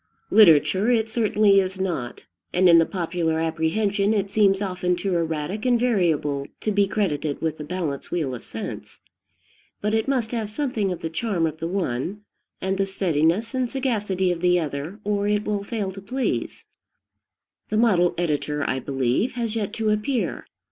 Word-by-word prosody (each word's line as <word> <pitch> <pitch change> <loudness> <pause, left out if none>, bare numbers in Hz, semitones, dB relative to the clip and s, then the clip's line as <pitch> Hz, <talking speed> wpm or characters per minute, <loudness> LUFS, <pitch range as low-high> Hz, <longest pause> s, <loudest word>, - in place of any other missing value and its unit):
Literature 190 +2 +5
it 225 -2 +1
certainly 210 -3 +4
is 190 0 -2
not, 170 -11 -3 0.3
and 185 +1 +4
in 170 -1 +8
the 165 - +3
popular 165 -3 -1
apprehension 200 +6 +1
it 200 -1 -1
seems 200 -2 +3
often 180 -2 -1
too 185 +2 -2
erratic 165 +5 -2
and 245 -2 +3
variable 160 - +1
to 215 - -1
be 200 -1 +3
credited 155 -8 -1
with 160 -1 -2
the - - -4
balance 155 -4 -4
wheel 155 -7 -1
of 120 - -7
sense; - - -7 0.8
but 210 +1 -1
it 220 +2 +1
must 250 -5 0
have 225 -4 -2
something 220 -5 -1
of 180 - -5
the 160 - -3
charm 180 -2 0
of 160 0 -3
the 165 - -2
one, 180 +1 -2 0.4
and 190 +1 -2
the 195 - +1
steadiness 185 +3 +1
and 255 -2 -1
sagacity 210 -9 0
of 170 -1 -3
the 180 0 +4
other, 155 +5 -4
or 205 0 0
it 210 0 +1
will 205 -1 -1
fail 205 -2 -3
to 195 +1 -10
please. 255 +7 -3 1.0
The 215 - 0
model 185 -7 +3
editor, 150 -3 -1
I 130 - 0
believe, 135 - 0
has 230 -3 -3
yet 205 -3 -2
to 220 -2 0
appear. 225 +4 -1
190 Hz, 175 wpm, -24 LUFS, 165-215 Hz, 1.0 s, in